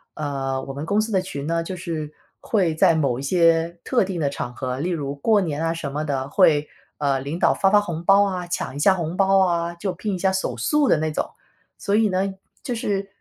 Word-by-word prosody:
啊， 135 Hz, -3 st, -2 dB
我 135 Hz, -, -7 dB
们 140 Hz, +2 st, -5 dB
公 205 Hz, +3 st, +2 dB
司 220 Hz, +1 st, -1 dB
的 190 Hz, -3 st, +2 dB
群 145 Hz, -6 st, -6 dB
呢， 165 Hz, +2 st, 0 dB
就 175 Hz, +3 st, -5 dB
是 165 Hz, -4 st, -5 dB, 0.3 s
会 185 Hz, -7 st, +1 dB
在 160 Hz, +1 st, +4 dB
某 140 Hz, -6 st, 0 dB
一 -, -, -5 dB
些 165 Hz, +2 st, +2 dB
特 250 Hz, -4 st, +2 dB
定 185 Hz, -2 st, -4 dB
的 145 Hz, -3 st, 0 dB
场 125 Hz, -3 st, -4 dB
合， 130 Hz, 0 st, -3 dB
例 170 Hz, +5 st, -1 dB
如 145 Hz, -5 st, -2 dB
过 210 Hz, +9 st, +3 dB
年 160 Hz, -3 st, -2 dB
啊 165 Hz, -, +1 dB
什 145 Hz, -4 st, -5 dB
么 150 Hz, +2 st, -2 dB
的， 135 Hz, -3 st, -2 dB
会， 150 Hz, -2 st, +3 dB, 0.3 s
呃， 140 Hz, -2 st, +1 dB
领 140 Hz, +5 st, -4 dB
导 -, -, +3 dB
发 195 Hz, -, +2 dB
发 210 Hz, +1 st, +5 dB
红 170 Hz, -5 st, -4 dB
包 195 Hz, +3 st, +6 dB
啊， 185 Hz, -3 st, -2 dB
抢 155 Hz, -6 st, -3 dB
一 -, -, -5 dB
下 190 Hz, +6 st, +4 dB
红 170 Hz, -1 st, -3 dB
包 195 Hz, 0 st, +3 dB
啊， 170 Hz, -1 st, -1 dB
就 185 Hz, +2 st, -3 dB
拼 200 Hz, +3 st, -3 dB
一 -, -, -3 dB
下 190 Hz, +1 st, +1 dB
手 190 Hz, -10 st, -2 dB
速 290 Hz, -, +2 dB
的 -, -, +4 dB
那 155 Hz, +1 st, -1 dB
种。 -, -, -1 dB, 0.5 s
所 200 Hz, -, -1 dB
以 215 Hz, 0 st, +3 dB
呢， 190 Hz, +1 st, 0 dB, 0.3 s
就 255 Hz, -, -3 dB
是， 200 Hz, -4 st, -2 dB
170 Hz, 260 characters per minute, -23 LUFS, 145-195 Hz, 0.5 s, 包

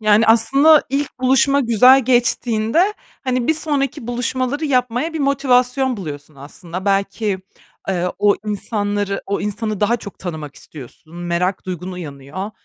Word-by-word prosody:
Yani, 215 Hz, +1 st, +4 dB
aslında 275 Hz, +8 st, +5 dB
ilk 280 Hz, -1 st, -2 dB
buluşma 270 Hz, +2 st, +3 dB
güzel 250 Hz, +2 st, +5 dB
geçtiğinde, 245 Hz, -, +1 dB, 0.3 s
hani, 255 Hz, 0 st, -1 dB
bir 320 Hz, -, +4 dB
sonraki 275 Hz, -6 st, -2 dB
buluşmaları 255 Hz, +4 st, -2 dB
yapmaya 255 Hz, +3 st, 0 dB
bir 320 Hz, -, -4 dB
motivasyon 260 Hz, -2 st, +2 dB
buluyorsun 150 Hz, -5 st, -8 dB
aslında. 170 Hz, +6 st, -8 dB
Belki, 200 Hz, 0 st, 0 dB, 0.5 s
eee, 180 Hz, -1 st, 0 dB
o 205 Hz, -1 st, +3 dB
insanları 205 Hz, -1 st, -2 dB
o 200 Hz, -, -2 dB
insanı 210 Hz, 0 st, -3 dB
daha 230 Hz, +3 st, +2 dB
çok 200 Hz, -3 st, -11 dB
tanımak 155 Hz, -5 st, -6 dB
istiyorsun, 155 Hz, +3 st, -13 dB
merak 175 Hz, +2 st, -2 dB
duygun 180 Hz, 0 st, -5 dB
uyanıyor 160 Hz, +3 st, -7 dB
220 Hz, 135 wpm, -19 LUFS, 185-260 Hz, 0.5 s, aslında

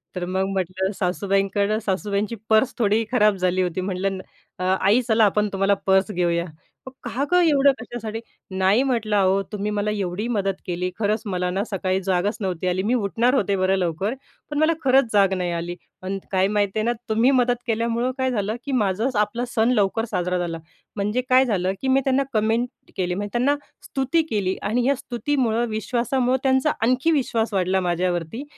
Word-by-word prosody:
तर 180 Hz, -1 st, -2 dB
मग 190 Hz, +1 st, -1 dB
म्हटलं 190 Hz, +1 st, -1 dB
सासूबाईंकडं 195 Hz, +2 st, 0 dB
सासूबाईंची 200 Hz, +2 st, -1 dB
पर्स 220 Hz, +4 st, +3 dB
थोडी 220 Hz, -1 st, +2 dB
खराब 215 Hz, -5 st, +4 dB
झाली 185 Hz, 0 st, +1 dB
होती. 180 Hz, 0 st, -1 dB
म्हटलं 190 Hz, +1 st, -2 dB
ना, 185 Hz, -, -8 dB, 0.5 s
अ, -, -, +1 dB
"आई, 210 Hz, +6 st, +5 dB
चला 220 Hz, -1 st, +4 dB
आपण 210 Hz, +1 st, +1 dB
तुम्हाला 195 Hz, +1 st, +2 dB
पर्स 190 Hz, +1 st, +3 dB
घेऊया." 170 Hz, -2 st, 0 dB, 0.6 s
"का 245 Hz, +3 st, -2 dB
गं 360 Hz, 0 st, +5 dB
एवढं 285 Hz, -3 st, +5 dB
कशासाठी?" 225 Hz, -3 st, -6 dB, 0.4 s
"नाही 190 Hz, +5 st, +3 dB
म्हटलं, 230 Hz, -5 st, 0 dB
अहो 195 Hz, 0 st, +3 dB
तुम्ही 210 Hz, 0 st, -3 dB
मला 210 Hz, 0 st, -1 dB
एवढी 200 Hz, +1 st, -2 dB
मदत 225 Hz, -4 st, 0 dB
मदत 195 Hz, -1 st, -2 dB
केली, 180 Hz, 0 st, -2 dB
खरंच 210 Hz, 0 st, +1 dB
मला 180 Hz, -3 st, -1 dB
ना 190 Hz, +2 st, -1 dB
सकाळी 190 Hz, -1 st, 0 dB
जागच 190 Hz, +4 st, 0 dB
नव्हती 185 Hz, -2 st, -2 dB
आली. 180 Hz, +1 st, 0 dB
मी 225 Hz, +5 st, +1 dB
उठणार 235 Hz, +2 st, +1 dB
होते 200 Hz, -7 st, +1 dB
बरं 190 Hz, 0 st, +2 dB
लवकर. 185 Hz, +4 st, -1 dB, 0.4 s
पण 295 Hz, -, -3 dB
मला 315 Hz, +2 st, +4 dB
खरंच 260 Hz, -3 st, +3 dB
जाग 195 Hz, -2 st, +4 dB
नाही 180 Hz, -2 st, -1 dB
आली. 170 Hz, +1 st, -3 dB, 0.3 s
आणि 195 Hz, +1 st, -3 dB
काय 190 Hz, 0 st, +3 dB
माहिती 205 Hz, 0 st, 0 dB
आहे -, -, 0 dB
ना? 240 Hz, -, +2 dB, 0.2 s
तुम्ही 225 Hz, +4 st, +3 dB
मदत 245 Hz, -2 st, +3 dB
केल्यामुळं 230 Hz, +2 st, 0 dB
काय 260 Hz, -1 st, 0 dB
झालं, 215 Hz, -2 st, -1 dB
की 280 Hz, -, -3 dB
माझच 225 Hz, +1 st, 0 dB
आपला 210 Hz, +4 st, 0 dB
सण 225 Hz, +1 st, +3 dB
लवकर 220 Hz, -1 st, +1 dB
साजरा 180 Hz, -2 st, 0 dB
झाला." 170 Hz, -2 st, -3 dB, 0.4 s
म्हणजे 210 Hz, +4 st, 0 dB
काय 255 Hz, +1 st, +6 dB
झालं, 190 Hz, -5 st, 0 dB
की 265 Hz, -, -2 dB
मी 265 Hz, +1 st, +4 dB
त्यांना 270 Hz, +1 st, +2 dB
कमेंट 230 Hz, +3 st, -1 dB
केली. 180 Hz, -1 st, -1 dB
म्हणजे 205 Hz, +2 st, -3 dB
त्यांना 255 Hz, +4 st, +2 dB, 0.3 s
स्तुती 270 Hz, +5 st, 0 dB
केली 195 Hz, -5 st, 0 dB
आणि 235 Hz, +4 st, 0 dB
या 280 Hz, -, +3 dB
स्तुतीमुळं, 245 Hz, -2 st, -1 dB
विश्वासामुळं 245 Hz, +4 st, 0 dB
त्यांचा 265 Hz, +2 st, +3 dB
आणखी 255 Hz, +7 st, +2 dB
विश्वास 230 Hz, -7 st, 0 dB
वाढला 190 Hz, 0 st, +1 dB
माझ्यावरती. 175 Hz, -, -2 dB
210 Hz, 185 wpm, -23 LUFS, 190-240 Hz, 0.6 s, काय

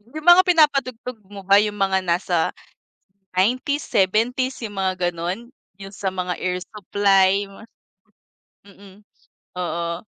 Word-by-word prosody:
Yung 310 Hz, -, -7 dB
mga 350 Hz, +1 st, +8 dB
pinapatugtog 275 Hz, -8 st, +1 dB
mo 200 Hz, -1 st, -10 dB
ba 200 Hz, +2 st, +5 dB
yung 210 Hz, -1 st, -2 dB
mga 195 Hz, -1 st, +1 dB
nasa 175 Hz, 0 st, 0 dB, 1.0 s
90s, 255 Hz, +8 st, +1 dB
70s, 235 Hz, +7 st, 0 dB
yung 205 Hz, -, -8 dB
mga 185 Hz, -2 st, 0 dB
gano'n? 175 Hz, +7 st, -5 dB, 0.3 s
Yung 195 Hz, 0 st, -10 dB
sa 195 Hz, -1 st, -3 dB
mga 180 Hz, -1 st, -3 dB
air 180 Hz, 0 st, -1 dB
supply? 200 Hz, -1 st, +1 dB, 1.2 s
Mm. 200 Hz, 0 st, -17 dB, 0.6 s
Oo. 170 Hz, 0 st, -3 dB
195 Hz, 120 wpm, -22 LUFS, 185-235 Hz, 1.2 s, mga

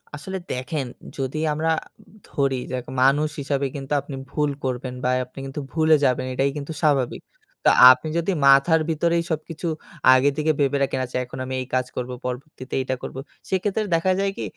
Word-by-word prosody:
আসলে 190 Hz, +6 st, -5 dB
দেখেন 135 Hz, +3 st, -3 dB, 0.3 s
যদি 135 Hz, +2 st, -2 dB
আমরা 160 Hz, +2 st, 0 dB, 0.6 s
ধরি 135 Hz, -2 st, 0 dB
যাক 125 Hz, -1 st, -3 dB, 0.2 s
মানুষ 145 Hz, +4 st, +4 dB
হিসাবে 140 Hz, 0 st, -1 dB
কিন্তু 140 Hz, 0 st, -4 dB
আপনি 140 Hz, -, -8 dB, 0.2 s
ভুল 150 Hz, 0 st, +1 dB
করবেন 130 Hz, 0 st, -3 dB
বা 125 Hz, -, +1 dB, 0.2 s
আপনি 125 Hz, +2 st, -13 dB
কিন্তু 135 Hz, +2 st, -5 dB
ভুলে 160 Hz, -1 st, +4 dB
যাবেন, 130 Hz, -1 st, +1 dB
এটাই 135 Hz, +2 st, +1 dB
কিন্তু 145 Hz, +2 st, -5 dB
স্বাভাবিক। 140 Hz, -6 st, +1 dB, 0.4 s
তো -, -, +8 dB, 0.2 s
আপনি 130 Hz, +5 st, 0 dB
যদি 170 Hz, +3 st, 0 dB
মাথার 140 Hz, +4 st, +6 dB
ভিতরেই 170 Hz, +1 st, +1 dB
সবকিছু 160 Hz, +2 st, -4 dB, 0.5 s
আগে 130 Hz, +2 st, +4 dB
থেকে 155 Hz, +1 st, +2 dB
ভেবে 140 Hz, 0 st, +2 dB
রাখেন 135 Hz, -1 st, -1 dB
আচ্ছা 125 Hz, -, -5 dB
এখন 125 Hz, -, -10 dB
আমি 130 Hz, -, -5 dB
এই 130 Hz, -, -6 dB
কাজ 130 Hz, 0 st, +1 dB
করব, 125 Hz, 0 st, -4 dB
পরবর্তীতে 130 Hz, +1 st, -6 dB
এইটা 130 Hz, 0 st, -2 dB
করব। -, -, -6 dB, 0.3 s
সেক্ষেত্রে 195 Hz, +3 st, 0 dB
দেখা 165 Hz, +3 st, +2 dB
যায় 195 Hz, 0 st, +1 dB
কি -, -, -4 dB
140 Hz, 175 wpm, -23 LUFS, 130-160 Hz, 0.6 s, তো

